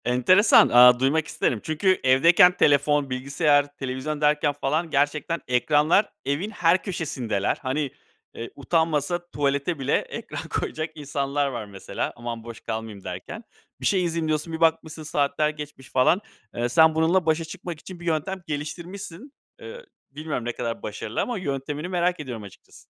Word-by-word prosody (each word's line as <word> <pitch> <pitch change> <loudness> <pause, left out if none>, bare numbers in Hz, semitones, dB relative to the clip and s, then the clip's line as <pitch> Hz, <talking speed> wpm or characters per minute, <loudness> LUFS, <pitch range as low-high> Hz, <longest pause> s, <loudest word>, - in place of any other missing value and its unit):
Enteresan. 125 - +5
Aaa, 125 0 +7
duymak 150 +4 +1
isterim. 115 - -1
Çünkü 185 +5 +1
evdeyken 165 +7 +6
telefon, 145 0 +3
bilgisayar, 145 +2 +1
televizyon 135 +3 -4
derken 150 0 +3
falan 150 +4 -1
gerçekten 150 +3 0
ekranlar 150 - +2
evin 150 +9 -1
her 180 -4 +2
köşesindeler. 130 - -2
Hani, 135 +1 -2 0.4
eee, 115 - -6
utanmasa 165 +3 -1
tuvalete 140 +2 -1
bile 135 - +1
ekran - - -6
koyacak 155 +1 -3
insanlar 145 -1 -2
var 120 -5 -5
mesela. 100 -2 -5
"Aman 120 -1 -6
boş 115 -1 -9
kalmayayım." 110 -3 -6
derken. - - -7 0.4
Bir - - -4
şey 190 -2 +2
izleyeyim 165 -2 -1
diyorsun 155 +1 -2
bir 160 - -4
bakmışsın 160 -1 +1
saatler 150 0 0
geçmiş 150 -3 -9
falan. 135 +9 +3 0.3
Eee, 120 +1 -1
sen 160 +5 +5
bununla 165 +3 +2
başa 160 +1 +1
çıkmak 170 0 -7
için 185 +1 -11
bir 175 - -10
yöntem 170 +4 -2
geliştirmişsin. 175 - -7 0.3
Eee, 485 0 -10 0.3
bilmiyorum 145 -4 -4
ne 120 - -1
kadar 115 -1 -4
başarılı 110 +1 -4
ama 245 -2 -2
yöntemini 145 -1 -4
merak 180 -1 0
ediyorum 125 -7 -6
açıkçası. 100 - -15
150 Hz, 150 wpm, -24 LUFS, 130-165 Hz, 0.4 s, Aaa